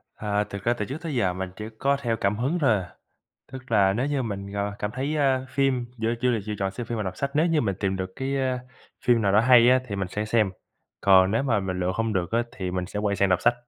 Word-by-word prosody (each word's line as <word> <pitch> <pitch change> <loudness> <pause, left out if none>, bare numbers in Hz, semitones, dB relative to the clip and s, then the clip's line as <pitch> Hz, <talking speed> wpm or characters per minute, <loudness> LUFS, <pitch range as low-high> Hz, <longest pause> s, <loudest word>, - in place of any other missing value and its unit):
À, 105 -1 -1
thực 100 -1 -8
ra 120 - +2
từ 105 -3 -3
trước 135 +7 -5
tới 160 -5 -4
giờ 95 -7 +1
mình 95 +1 -4
chỉ 105 +2 -6
có 140 +1 +2
theo 115 -3 -1
cảm 100 0 0
hứng 140 +9 0
thôi 135 -6 +3
à. 90 -3 -4 0.6
Tức 130 -1 -9
là 100 -3 +4
nếu 125 +7 -1
như 145 -2 0
mình, 100 -3 -5
ờ, 100 0 -2
cảm 105 - -2
thấy 135 +6 -2 0.3
phim 130 -2 0
giữa 115 +1 0
chủ 125 0 +2
đề 115 - 0
chỉ 105 - -4
chọn 95 -1 -1
xem 115 +5 -6
phim 120 -1 -3
và 105 - -1
đọc 95 -2 -5
sách, 140 - -2
nếu 155 +3 +3
như 165 -3 +2
mình 100 -6 0
tìm 95 -1 0
được 95 0 -4
cái, 135 +1 -2
ơ, 130 -1 0 0.5
phim 120 -2 +4
nào 100 -1 +2
đó 105 - +6
hay 125 0 +6
á 130 0 +5
thì 100 -4 -4
mình 95 -2 -2
sẽ 105 +3 -3
xem. 110 -2 +2 0.5
Còn 95 -1 +5
nếu 115 +5 +1
mà 120 -7 +1
mình 95 -1 -3
lựa 90 +1 0
không 115 +2 -1
được 90 -3 -1
á 115 +1 +2
thì 95 -3 -4
mình 90 0 -2
sẽ 105 - -5
quay 105 -1 0
sang 100 - +2
đọc 90 -1 +2
sách. 120 - +4
110 Hz, 285 wpm, -25 LUFS, 100-125 Hz, 0.6 s, đó